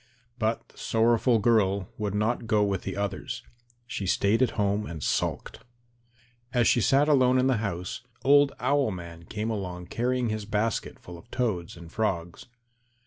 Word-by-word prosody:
But 110 0 -1
the - - -18
sorrowful 115 +1 +3
girl 100 -4 +2
would 105 -2 -2
not 115 +2 0
go 105 -1 +3
with 100 -2 0
the - - -5
others. 100 0 -3 0.4
She 100 -5 -4
stayed 100 +5 +2
at 130 - +4
home 105 0 +1
and 80 -4 -6
sulked. - - -1 0.9
As 120 -2 +3
she 120 - +4
sat 135 +8 +4
alone 130 -4 +4
in 130 - +3
the 130 -3 +3
house, 100 -1 -4 0.2
old 145 0 +5
Owl 140 -4 +2
man 85 -3 -8
came 105 +5 -3
along 90 -4 -4
carrying 125 0 0
his 110 -1 -3
basket 110 +1 -1
full 90 -1 -11
of 115 - -19
toads 105 -11 -2
and 85 -1 -11
frogs. 85 -6 -2
110 Hz, 165 wpm, -27 LUFS, 95-120 Hz, 0.9 s, old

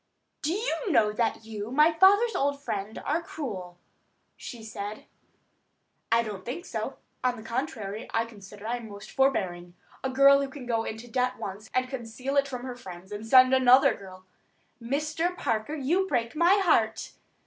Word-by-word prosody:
"Do 310 +3 0
you 440 0 -2
know 215 -7 +4
that 225 0 -1
you, 215 -1 -6
my 300 +6 +4
father's 405 +7 +5
old 280 0 0
friend, 210 -5 -4
are 315 +4 +1
cruel," 195 - -6 0.6
she 235 -2 -9
said. 210 -1 -6 1.1
"I 230 0 +4
don't 205 -4 -6
think 325 +9 -5
so. - - -4 0.3
On 250 -1 +1
the 220 - -10
contrary, 225 -4 -4
I 225 0 +1
consider 205 -2 -13
that 225 - -3
I 245 - 0
am 230 -2 -9
most 205 0 -10
forbearing. 180 -10 0 0.3
A 265 - 0
girl 275 +1 +6
who 275 - -2
can 265 -2 -9
go 230 -2 0
into 225 +2 -6
debt 250 +1 0
once, 205 +2 -7
and 255 0 +1
conceal 255 +1 -5
it 280 0 +3
from 250 -2 -6
her 255 -1 -5
friends, 185 -4 -11
and 210 +2 -6
send 255 +2 +7
another 260 0 +6
girl——" 185 -1 -12 0.6
"Mr. 305 +8 -1
Parker, 230 +3 -1
you 335 +7 +1
break 240 -5 -1
my 340 +4 +5
heart." 230 - +2
245 Hz, 175 wpm, -27 LUFS, 215-280 Hz, 1.1 s, send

